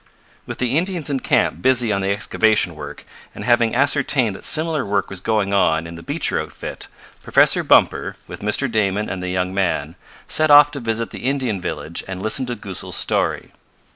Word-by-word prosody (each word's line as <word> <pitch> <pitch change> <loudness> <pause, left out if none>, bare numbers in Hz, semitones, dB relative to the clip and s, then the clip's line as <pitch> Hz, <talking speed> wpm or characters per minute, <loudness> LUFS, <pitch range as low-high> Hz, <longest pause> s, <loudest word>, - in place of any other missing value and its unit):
With - - -6
the 125 +1 -1
Indians 175 -5 -2
in 135 - 0
camp - - 0
busy 125 -4 +2
on 100 - -1
the 95 - -1
excavation 105 -2 +1
work, 75 -2 -10 0.3
and - - -7
having 120 -1 +2
ascertained 135 -4 +2
that - - -12
similar 155 -2 0
work 100 -1 -2
was 95 - -6
going 100 0 -1
on 80 -5 +2
in 85 - -8
the 85 - -10
Beecher - - 0
outfit, - - -7 0.3
Professor - - +3
Bumper, - - +2
with - - -9
Mr. 105 +7 0
Damon 105 -3 0
and 95 -1 -5
the 90 - -4
young 90 0 -2
men, 85 -5 -1 0.3
set 155 0 +2
off 145 0 +8
to 140 - -6
visit 115 -1 -3
the - - -8
Indian 130 -8 -2
village 85 -1 -4
and 95 -1 -6
listen 110 +6 0
to 120 - -3
Goosal's 100 -5 -5
story. - - 0
110 Hz, 190 wpm, -20 LUFS, 95-130 Hz, 0.3 s, off